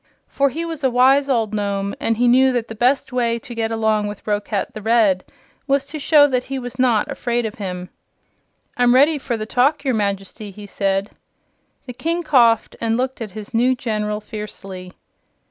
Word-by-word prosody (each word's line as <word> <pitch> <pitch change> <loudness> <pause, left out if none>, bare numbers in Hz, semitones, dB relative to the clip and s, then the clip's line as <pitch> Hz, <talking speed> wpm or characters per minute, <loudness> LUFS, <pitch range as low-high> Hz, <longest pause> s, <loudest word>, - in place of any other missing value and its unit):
For 280 0 +1
he 325 +6 -4
was 325 -3 -6
a 265 - +4
wise 265 +3 +4
old 225 -5 0
Nome, 200 -1 -2
and 225 -1 0
he 245 +1 +3
knew 260 +2 +5
that 240 -2 -2
the - - -5
best 250 +4 +1
way 235 -2 +1
to 245 +1 -10
get 225 -1 -1
along 220 -2 0
with 205 -1 -8
Roquat 205 -1 -2
the 215 - -7
Red 215 -4 +3 0.4
was 275 -1 +1
to 300 +2 -7
show 295 0 +5
that 255 -3 0
he 270 0 -4
was 250 0 -7
not 240 -4 +2
afraid 240 -1 -1
of 215 - -4
him. 180 -2 -5 0.9
"I'm 245 0 +4
ready 290 +3 +4
for 240 -3 -3
the 215 - -4
talk, 275 +6 +1
your 265 -3 0
Majesty," 200 0 -3
he 205 +1 -11
said. 195 0 -1 0.7
The 250 - -7
King 335 +7 -2
coughed 235 -7 +3
and 225 0 +1
looked 260 0 -2
at 220 - -4
his 215 +2 -8
new 250 +3 +3
General 210 -3 -2
fiercely. 195 -3 -8
235 Hz, 195 wpm, -20 LUFS, 210-260 Hz, 0.9 s, knew